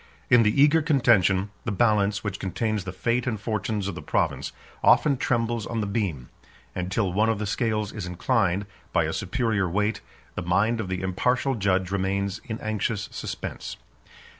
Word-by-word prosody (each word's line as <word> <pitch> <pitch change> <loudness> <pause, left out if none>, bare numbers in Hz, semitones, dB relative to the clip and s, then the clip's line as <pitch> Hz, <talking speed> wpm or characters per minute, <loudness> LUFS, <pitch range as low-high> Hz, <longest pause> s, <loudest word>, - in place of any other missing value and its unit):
In 120 -1 +8
the 105 +4 +2
eager 150 +3 +6
contention, 105 - +3
the 110 - -2
balance, 105 -1 +2
which 100 -3 -3
contains 105 +2 -2
the 95 - -4
fate 120 +6 -1
and 110 -4 -1
fortunes 105 -1 -2
of 100 - -3
the 85 - -7
province, - - -1 0.3
often 145 -2 +5
trembles 120 -3 -1
on 115 - -2
the 105 - 0
beam; 100 - -2 0.4
and 90 +1 -4
till 95 -3 0
one 110 +4 +3
of 115 - +1
the 105 - -3
scales 105 0 -1
is 100 -5 -5
inclined, 95 0 +1 0.3
by - - +3
a - - -2
superior 110 -7 0
weight, 105 +5 0 0.3
the - - -4
mind 100 +7 +1
of 105 - -5
the 95 0 -3
impartial 125 +8 +1
judge 95 -4 0
remains 100 +1 -1
in 110 -1 -5
anxious 110 -1 -2
suspense. - - -6
105 Hz, 175 wpm, -25 LUFS, 95-115 Hz, 0.4 s, In